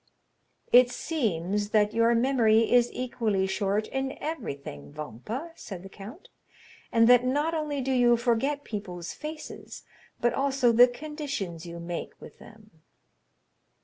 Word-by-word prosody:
"It 245 0 +7
seems 205 - -2
that 210 0 +2
your 230 +1 +3
memory 230 -3 +3
is 245 -1 +5
equally 225 -6 -1
short 200 +2 -1
in 270 0 -3
everything, 140 - -6
Vampa," 210 - -6
said 190 - -9
the 195 - -10
count, 215 - -11 0.6
"and 230 0 +5
that 245 0 +7
not 290 +6 0
only 300 -3 -2
do 265 +1 -2
you 240 -2 +4
forget 255 +5 0
people's 180 - -6
faces, 305 0 -8 0.4
but 240 - +2
also 270 -3 +2
the 240 +2 +7
conditions 245 - -5
you 170 0 -7
make 170 0 -6
with - - -13
them." 215 -7 -17
235 Hz, 135 wpm, -27 LUFS, 200-270 Hz, 0.6 s, It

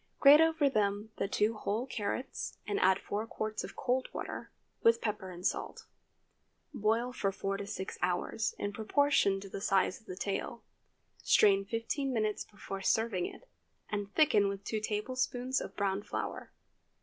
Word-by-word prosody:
Grate 290 +2 +9
over 320 -2 +4
them 210 -3 0
the - - 0
two 210 +2 +1
whole 215 +2 -2
carrots, 250 +2 -4
and 205 - -1
add 190 0 +5
four 210 +3 -4
quarts 215 -1 -3
of - - -8
cold 255 0 0
water, - - -5 0.3
with 230 0 +5
pepper 210 -4 -3
and 180 0 -8
salt. - - -2 0.9
Boil 225 +4 +1
from 195 -5 0
four 195 0 -2
to 200 0 -6
six 190 -2 -5
hours, 180 +4 0
in 205 0 -3
proportion 220 -3 +2
to 195 - -9
the 195 - -6
size 195 -3 +2
of - - -28
the 185 - -6
tail. 200 +4 -3 0.6
Strain 195 -1 +5
fifteen 230 +6 -2
minutes 215 -3 0
before 195 -2 -7
serving 220 -3 +1
it, - - -12 0.4
and 205 -1 -2
thicken 250 -10 +5
with 200 0 -4
two 220 - -2
tablespoonfuls 250 +4 -1
of - - -7
browned 200 0 -1
flour. - - -4
210 Hz, 160 wpm, -32 LUFS, 200-240 Hz, 0.9 s, Grate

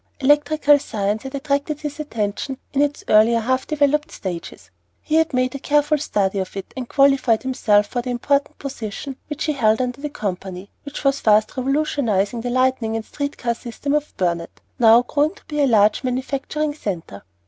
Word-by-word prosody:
Electrical 295 +1 +4
science 210 -4 -2
had 265 +1 -7
attracted 285 +1 -1
his 295 0 -5
attention 230 -1 -3 0.2
in 280 - +2
its 290 0 0
earlier, 220 +2 +5
half 260 +3 -1
developed 300 +1 +1
stages; 175 -3 -7 0.3
he 305 - -6
had 320 0 +3
made 255 -1 0
a 275 - -5
careful 295 +2 +2
study 200 -8 0
of 190 +1 -5
it, 195 - -7
and 255 -2 -6
qualified 275 -5 +3
himself 215 -6 +2
for 245 +4 -3
the 250 - -6
important 280 +4 0
position 270 0 -6
which 300 +1 -4
he 305 - 0
held 220 -5 +2
under 250 +1 -2
the 295 - -3
company, 190 -4 -5
which 285 - -8
was 275 0 +2
fast 215 0 +3
revolutionizing 255 -6 0
the 245 - -3
lighting 255 -3 +1
and 225 -1 -3
street 285 -1 -4
car 235 -1 -1
system 240 +4 -4
of 300 0 -2
Burnet, 170 -2 -2 0.2
now 230 0 +7
growing 295 +7 0
to - - -20
be 295 -1 -2
a 280 - +4
large 215 -1 +4
manufacturing 275 +4 -2
centre. 175 - -5
260 Hz, 180 wpm, -21 LUFS, 215-290 Hz, 0.3 s, now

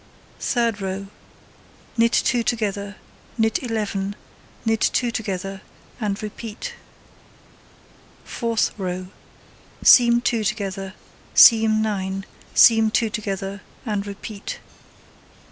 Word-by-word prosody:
Third 230 -4 0
row: 195 +1 -4 0.9
Knit 230 0 +3
2 245 -1 +2
together, 205 -3 -2 0.4
knit 220 -1 +1
11, 205 -4 -2 0.5
knit 225 -1 +1
2 245 -2 +1
together, 195 -3 -4 0.4
and 210 -2 -2
repeat. 215 +1 -6 1.5
Fourth 230 -2 -1
row: 185 -1 -4 0.7
Seam 235 -1 +7
2 235 -2 0
together, 195 -2 -3 0.4
seam 220 -1 +7
9, 195 -2 -2 0.3
seam 225 -1 +6
2 220 0 +1
together, 200 -2 -4 0.2
and 205 -3 -2
repeat. 200 +1 -7
210 Hz, 95 wpm, -22 LUFS, 195-225 Hz, 1.5 s, Seam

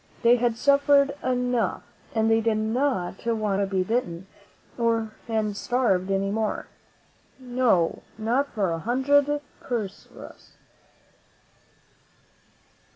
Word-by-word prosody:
They 235 +1 +6
had 235 -1 0
suffered 280 +1 +4
enough, 250 -2 0 0.3
and 220 0 +2
they 225 0 +3
did 220 -1 +1
not 220 -4 -1
want 215 -4 0
to 200 - 0
be 190 -1 0
bitten 185 -5 -2 0.5
and 225 -2 -1
starved 200 -6 0
any 195 0 0
more 215 0 -2 0.4
— - - -36
no, 245 -9 +1 0.2
not 240 +6 0
for 195 -6 0
a 165 - -2
hundred 285 - +2 0.2
Perus. 215 -6 -7
225 Hz, 105 wpm, -25 LUFS, 200-250 Hz, 0.5 s, They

